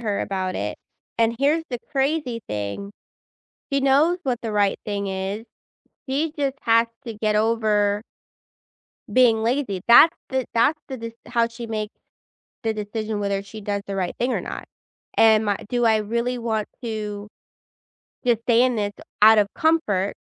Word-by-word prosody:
her 210 Hz, -4 st, -1 dB
about 185 Hz, -1 st, -2 dB
it, -, -, -3 dB, 0.4 s
and 230 Hz, 0 st, +2 dB
here's 300 Hz, +4 st, +2 dB
the 245 Hz, -, -2 dB
crazy 270 Hz, -3 st, 0 dB
thing, 105 Hz, -, -4 dB, 0.8 s
she 275 Hz, -, +2 dB
knows 290 Hz, +6 st, +3 dB
what 250 Hz, -5 st, -1 dB
the 225 Hz, -, -3 dB
right 205 Hz, -1 st, +2 dB
thing 200 Hz, -1 st, -3 dB
is, 195 Hz, +4 st, -4 dB, 0.6 s
she 295 Hz, +4 st, 0 dB
just 275 Hz, -1 st, 0 dB
has 230 Hz, 0 st, +4 dB, 0.2 s
to 230 Hz, -, -5 dB
get 215 Hz, 0 st, 0 dB
over 210 Hz, -2 st, +2 dB, 1.1 s
being 230 Hz, -3 st, +4 dB
lazy, 230 Hz, -6 st, -1 dB
that's 310 Hz, +8 st, +8 dB
the 260 Hz, -1 st, -1 dB
that's 290 Hz, +7 st, +3 dB
the 265 Hz, -, -5 dB
de 230 Hz, -1 st, -7 dB
how 235 Hz, -1 st, +1 dB
she 235 Hz, 0 st, -8 dB
makes 215 Hz, -1 st, -4 dB, 0.7 s
the 225 Hz, -1 st, 0 dB
decision 215 Hz, 0 st, -4 dB
whether 200 Hz, -1 st, -1 dB
she 200 Hz, +2 st, -10 dB
does 200 Hz, 0 st, -2 dB
the 195 Hz, -, -4 dB
right 185 Hz, -2 st, -1 dB
thing 250 Hz, +2 st, +1 dB
or -, -, -1 dB
not. -, -, -7 dB, 0.5 s
Am 220 Hz, -1 st, +5 dB
I 200 Hz, -, +1 dB
do 240 Hz, -1 st, +1 dB
I 220 Hz, -1 st, +5 dB
really 235 Hz, +4 st, -1 dB
want 220 Hz, -3 st, -2 dB, 0.2 s
to 210 Hz, -3 st, -4 dB, 1.0 s
just 235 Hz, -2 st, +2 dB
stay 235 Hz, 0 st, +4 dB
in 255 Hz, -1 st, +2 dB
this 205 Hz, -2 st, -1 dB, 0.3 s
out 220 Hz, +1 st, +8 dB
of 205 Hz, -, +3 dB
comfort, 245 Hz, -, +1 dB
225 Hz, 165 wpm, -23 LUFS, 205-245 Hz, 1.1 s, that's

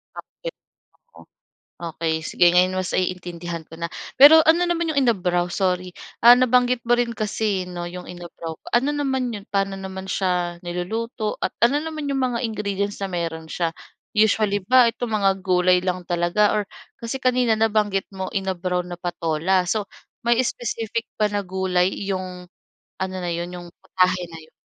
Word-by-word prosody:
Pakbet. -, -, -9 dB, 1.3 s
Okey 160 Hz, -1 st, -2 dB
sige. 175 Hz, +2 st, +2 dB
Ngayon 185 Hz, +1 st, +3 dB
mas 185 Hz, -1 st, -2 dB
naiintindihan 175 Hz, -2 st, -3 dB
ko 160 Hz, -, -13 dB
na, 170 Hz, 0 st, -4 dB, 0.3 s
pero 295 Hz, +4 st, +10 dB
ano 330 Hz, +2 st, +5 dB
naman 340 Hz, -1 st, 0 dB
yung 280 Hz, -, +3 dB
inabraw? 180 Hz, -7 st, +1 dB
Sorry, 180 Hz, -1 st, -1 dB, 0.3 s
ah, 240 Hz, +1 st, +10 dB
nabanggit 250 Hz, -1 st, +3 dB
mo 240 Hz, -, +5 dB
rin 240 Hz, -1 st, 0 dB
kasi 210 Hz, -3 st, -1 dB
'no, 180 Hz, -1 st, -6 dB
yung 180 Hz, 0 st, -8 dB
inabraw. 170 Hz, -2 st, -8 dB, 0.2 s
Ano 270 Hz, +5 st, +2 dB
naman 265 Hz, -4 st, -1 dB
yun? 205 Hz, -, -6 dB
Paano 195 Hz, -1 st, 0 dB
naman 190 Hz, 0 st, -7 dB
siya 180 Hz, -2 st, -1 dB
niluluto? 210 Hz, +6 st, -3 dB
At -, -, +1 dB, 0.2 s
ano 290 Hz, +4 st, 0 dB
naman 310 Hz, -2 st, -5 dB
yung 270 Hz, -1 st, 0 dB
mga 245 Hz, -1 st, 0 dB
ingredients 200 Hz, -2 st, -3 dB
na 195 Hz, -, -2 dB
meron 160 Hz, -2 st, -4 dB
siya? 165 Hz, -2 st, -1 dB, 0.4 s
Usually, 210 Hz, -2 st, +2 dB
ba 250 Hz, +4 st, +5 dB
itong 240 Hz, -1 st, -4 dB
mga 200 Hz, -2 st, +3 dB
gulay 180 Hz, -1 st, +3 dB
lang 180 Hz, -1 st, -2 dB
talaga 175 Hz, +5 st, +2 dB
or 210 Hz, -, +1 dB, 0.4 s
kasi 235 Hz, +3 st, -3 dB
kanina 250 Hz, -3 st, +2 dB
nabanggit 210 Hz, -3 st, +1 dB
mo, 190 Hz, -1 st, -4 dB
inabraw 185 Hz, -2 st, -2 dB
na 175 Hz, -, -6 dB
patola. 175 Hz, +1 st, 0 dB
So, 210 Hz, +2 st, -1 dB, 0.4 s
may 235 Hz, 0 st, +2 dB
specific 230 Hz, -1 st, -3 dB
ba 210 Hz, -, +3 dB
na 205 Hz, -1 st, -1 dB
gulay 185 Hz, -1 st, 0 dB, 0.2 s
yung 185 Hz, -2 st, -4 dB, 0.5 s
ano 190 Hz, 0 st, -3 dB
na 175 Hz, -, -2 dB
yun, 175 Hz, +1 st, -4 dB
yung 175 Hz, -1 st, -8 dB
putahe 185 Hz, 0 st, +1 dB
na 165 Hz, -, -9 dB
yun? 155 Hz, -, -19 dB
190 Hz, 165 wpm, -23 LUFS, 180-230 Hz, 1.3 s, pero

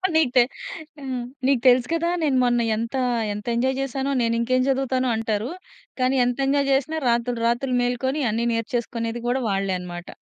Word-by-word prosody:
నీకు 305 Hz, -6 st, +3 dB
తె 245 Hz, -, +8 dB, 0.6 s
హ్మ్. 260 Hz, -3 st, -4 dB, 0.2 s
నీకు 270 Hz, -4 st, +3 dB
తెలుసు 250 Hz, 0 st, +5 dB
కదా! 335 Hz, +1 st, +1 dB
నేను 275 Hz, -4 st, +2 dB
మొన్న 240 Hz, -1 st, +2 dB
ఎంత, 230 Hz, +4 st, -3 dB, 0.4 s
ఎంత 210 Hz, 0 st, -7 dB
ఎంజాయ్ 260 Hz, +2 st, +1 dB
చేసానో! 270 Hz, +1 st, -2 dB
నేను 230 Hz, 0 st, +1 dB
ఇంకేం 255 Hz, +2 st, +2 dB
చదువుతానో 260 Hz, -1 st, +1 dB
అంటారు. 220 Hz, +1 st, -1 dB, 0.5 s
కానీ 255 Hz, +1 st, +2 dB
ఎంత 245 Hz, +1 st, -1 dB
ఎంజాయ్ 280 Hz, 0 st, +2 dB
చేసినా 310 Hz, +4 st, 0 dB
రాత్రులు 235 Hz, 0 st, 0 dB
రాత్రులు 250 Hz, +2 st, 0 dB
మేలుకొని 260 Hz, +4 st, -1 dB
అన్ని 230 Hz, +2 st, -1 dB
నేర్చేసుకునేది 230 Hz, 0 st, -2 dB
కూడా 255 Hz, +2 st, +1 dB
వాళ్ళే 195 Hz, -1 st, 0 dB
అన్నమాట. 175 Hz, -1 st, -8 dB
245 Hz, 165 wpm, -23 LUFS, 230-265 Hz, 0.6 s, తె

